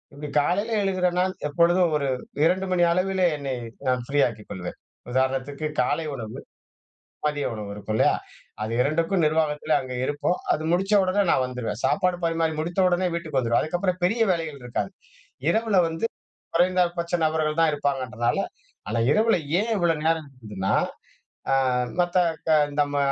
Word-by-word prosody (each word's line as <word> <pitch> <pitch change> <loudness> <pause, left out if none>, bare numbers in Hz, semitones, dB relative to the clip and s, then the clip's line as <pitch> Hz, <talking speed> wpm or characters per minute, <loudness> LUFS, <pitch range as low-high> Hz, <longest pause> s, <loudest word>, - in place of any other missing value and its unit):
இப்டி 150 +1 -6
காலையில 200 +9 0
எழுகிறேனா 185 -2 +1
நான் 185 0 -2
எப்பொழுதும் 170 +2 +3
ஒரு 140 -2 -2 0.4
2:00 190 +3 +2
மணி 175 -1 +3
அளவிலே 185 0 +1
என்னை 135 -2 -3 0.3
நான் 125 -1 +2
ஃப்ரீ 145 +2 0
ஆக்கிக் 110 -3 -9
கொள்வேன். 90 -2 -6 0.3
உதாரணத்துக்கு 135 +3 0
காலை 160 +5 0
உணவு, 110 -5 -6 0.9
மதிய 145 -1 0
உணவு 105 -2 -6
இருக்கும் 105 +1 -4
இல்லையா. - - +4 0.5
அது 110 - -3
2க்கும் 165 +5 +1
நிர்வாகத்தில 155 0 +1
அங்கே 130 -1 -6
இருப்போம், 145 +4 0 0.2
அது 155 - -2
முடிச்ச 195 +4 +1
உடனே 185 +2 +2
நான் 130 - +3
வந்துருவேன், 125 -4 -4
சாப்பாடு 175 +6 +1
பரிமாறி 165 -1 +1
முடித்த 170 +4 -2
உடனே 180 +1 +1
வீட்டுக்கு 160 -5 -3
வந்துவிருவேன். 120 -2 +2
அதுக்கு 155 +3 -2
அப்புறம் 185 -1 0
பெரிய 225 +6 +3
வேலைகள் 160 -5 -3
இருக்காது. 125 +9 -3 0.6
இரவுல 220 -3 +2
வந்து, 165 +7 -2 0.5
குறைந்தபட்ச 175 -1 +2
நபர்கள் 155 0 0
தான் 160 -2 +4
இருப்பாங்கன்றதுனால, 130 -5 -1 0.5
அல 115 +1 0
இரவு 220 +1 +3 0.2
ஏன் 230 +1 -2
இவ்வளோ 170 -2 +2
நேரம் 160 -2 +1
இருக்குதுனா, 105 -6 -3 0.8
ஆ - - +5 0.5
மத்த 175 +1 0 0.3
க - - +3 0.3
நம்ம 145 0 0
160 Hz, 150 wpm, -25 LUFS, 135-180 Hz, 0.9 s, ஆ